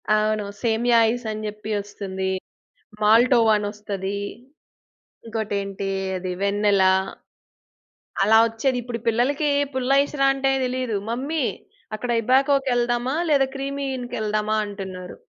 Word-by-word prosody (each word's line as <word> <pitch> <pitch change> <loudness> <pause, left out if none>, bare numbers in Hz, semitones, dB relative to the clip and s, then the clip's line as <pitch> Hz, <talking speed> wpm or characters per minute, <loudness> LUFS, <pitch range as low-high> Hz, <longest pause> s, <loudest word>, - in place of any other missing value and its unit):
అవును. 215 -1 +1 0.2
సేమియా 235 +1 +2
ఐస్ 245 +1 -3
అని 215 0 -5
చెప్పి 210 +1 -7
వస్తుంది. 190 -2 -4 0.7
మాల్టోవా 230 +1 +5
అనోస్తది. 205 -1 -4 1.1
ఇంకోటేంటి 200 -3 -3 0.3
అది 185 0 -4
వెన్నెల. 200 -1 +2 1.4
అలా 220 +2 +5
వచ్చేది 245 +3 -1
ఇప్పుడు 235 -1 -5
పిల్లలకి 275 +6 +1 0.2
పుల్లైస్‌రా 275 +2 +2
అంటే 270 0 +1
తెలీదు. 250 -3 -2
మమ్మీ 275 +5 -1 0.5
అక్కడ 240 +3 -3
ఇబాకో 270 +4 +4
కేళ్దామా? 245 +2 0
లేదా 275 -2 +4
క్రీమీ 275 +1 -3
ఇన్‌కి 245 -1 -6
యేళ్దామా 215 0 0
అంటున్నారు. 190 -3 -7
225 Hz, 105 wpm, -23 LUFS, 205-255 Hz, 1.4 s, మాల్టోవా